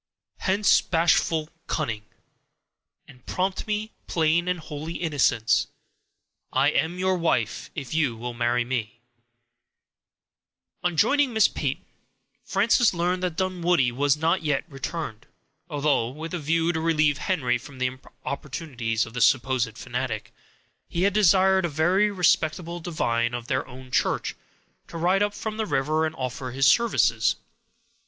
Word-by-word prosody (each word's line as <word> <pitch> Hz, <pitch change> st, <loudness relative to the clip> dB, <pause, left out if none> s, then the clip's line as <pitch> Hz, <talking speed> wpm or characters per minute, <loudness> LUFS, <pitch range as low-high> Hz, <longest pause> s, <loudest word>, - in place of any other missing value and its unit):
Hence, 200 Hz, +1 st, +3 dB
bashful 165 Hz, -2 st, +1 dB, 0.2 s
cunning! 115 Hz, -9 st, -2 dB, 1.0 s
And 125 Hz, -2 st, -17 dB
prompt 185 Hz, +2 st, -2 dB
me, 215 Hz, +1 st, -2 dB, 0.2 s
plain 165 Hz, +1 st, +2 dB
and 180 Hz, -1 st, 0 dB
holy 155 Hz, +1 st, -6 dB
innocence; 145 Hz, -9 st, +1 dB, 0.8 s
I 135 Hz, +2 st, +3 dB
am 165 Hz, +4 st, 0 dB
your 185 Hz, 0 st, +1 dB
wife, 170 Hz, -2 st, -1 dB
if 140 Hz, -4 st, -5 dB
you 145 Hz, -8 st, +1 dB
will 120 Hz, +1 st, -5 dB
marry 120 Hz, 0 st, 0 dB
me. 125 Hz, -1 st, 0 dB
—Tempest. 110 Hz, +2 st, -19 dB, 1.9 s
On 175 Hz, -2 st, 0 dB
joining 275 Hz, -, +3 dB
Miss 220 Hz, -1 st, +5 dB
Peyton, -, -, -3 dB, 0.6 s
Frances 215 Hz, +2 st, +3 dB
learned 180 Hz, +2 st, 0 dB
that 180 Hz, -3 st, -2 dB
Dunwoodie 175 Hz, -7 st, +1 dB
was 140 Hz, +3 st, +2 dB
not 165 Hz, +4 st, +1 dB
yet 150 Hz, -3 st, 0 dB
returned; 135 Hz, -5 st, -6 dB, 0.4 s
although, 145 Hz, -6 st, +1 dB
with 160 Hz, +6 st, -7 dB
a 175 Hz, -, -2 dB
view 165 Hz, +3 st, +1 dB
to 160 Hz, -, -2 dB
relieve 155 Hz, -3 st, +2 dB
Henry 125 Hz, -10 st, 0 dB
from 135 Hz, +2 st, -12 dB
the 130 Hz, 0 st, -2 dB, 0.3 s
importunities 130 Hz, -6 st, -3 dB
of 115 Hz, -, -12 dB
the 125 Hz, -, -3 dB
supposed 130 Hz, -4 st, +2 dB
fanatic, -, -, -4 dB, 0.5 s
he 170 Hz, -, -2 dB
had 200 Hz, 0 st, +3 dB
desired 190 Hz, -1 st, +4 dB
a 175 Hz, -, 0 dB
very 175 Hz, +8 st, +2 dB
respectable 175 Hz, -2 st, +1 dB
divine 120 Hz, -8 st, -1 dB
of 120 Hz, -1 st, -5 dB
their 130 Hz, +1 st, -1 dB
own 130 Hz, 0 st, -12 dB
church -, -, 0 dB, 0.5 s
to 170 Hz, -, -8 dB
ride 180 Hz, +4 st, +2 dB
up 205 Hz, 0 st, +1 dB
from 215 Hz, 0 st, -5 dB
the 220 Hz, -1 st, -1 dB
river 155 Hz, +3 st, +1 dB
and 155 Hz, -, -7 dB
offer 130 Hz, 0 st, -4 dB
his 135 Hz, +2 st, +1 dB
services. 235 Hz, -, +3 dB
160 Hz, 145 wpm, -25 LUFS, 130-180 Hz, 1.9 s, Miss